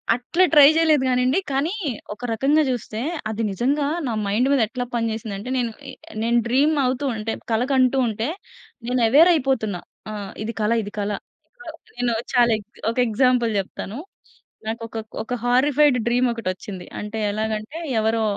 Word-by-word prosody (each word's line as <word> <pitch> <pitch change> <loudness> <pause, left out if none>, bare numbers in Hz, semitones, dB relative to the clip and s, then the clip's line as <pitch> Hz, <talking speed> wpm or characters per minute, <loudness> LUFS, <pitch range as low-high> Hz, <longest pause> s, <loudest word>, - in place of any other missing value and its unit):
అట్లా 290 +9 +1
ట్రై 290 -2 +9
చేయలేదు 315 -4 +4
కాని 250 0 +2
అండి. 260 +8 +3
కానీ 280 +7 0 0.4
ఒక 240 +4 -8
రకంగా 285 +7 +3
చూస్తే 225 -3 -3 0.3
అది 220 +1 -3
నిజంగా 280 +8 0 0.2
నా 235 - -1
మైండ్ 220 +6 +2
మీద 275 -4 +3
ఎట్లా 245 +1 -4
పని 230 -1 0
చేసింది 220 -2 -5
అంటే, 215 +6 -7
నేను 235 -2 0 0.2
ఆహ్, 265 - -9 0.3
నేను 235 +1 +2
డ్రీమ్ 280 +6 +3
అవుతూ 255 +3 -1
ఉంటే, 220 +1 -3 0.2
కల 225 +2 +2
కంటూ 260 0 +3
ఉంటే. 220 +2 -2 0.6
నేను 250 0 +1
ఎవేర్ 315 +8 +7
అయిపోతున్న. 260 - 0 0.4
ఆ! - - -5 0.3
ఇది 230 - -4
కల 210 +2 +1
ఇది 205 - -7
కల 205 +1 -1 0.9
నేను 245 -1 0 0.2
ఛ - - -12 0.6
ఒక 230 - -10
ఎగ్జాంపుల్ 240 +1 +2
చెప్తాను. 195 +3 -6 0.7
నాకొక 230 0 -5 0.3
ఒక 245 - -5
హారిఫైడ్ 265 +2 +4
డ్రీమ్ 245 +1 +3
ఒకటి 230 -4 -5
వచ్చింది. 185 -1 -9
అంటే 210 +1 -5
ఎలాగంటే, 215 +6 -3 0.2
ఎవరో 220 +1 +1
245 Hz, 160 wpm, -22 LUFS, 220-270 Hz, 0.9 s, ట్రై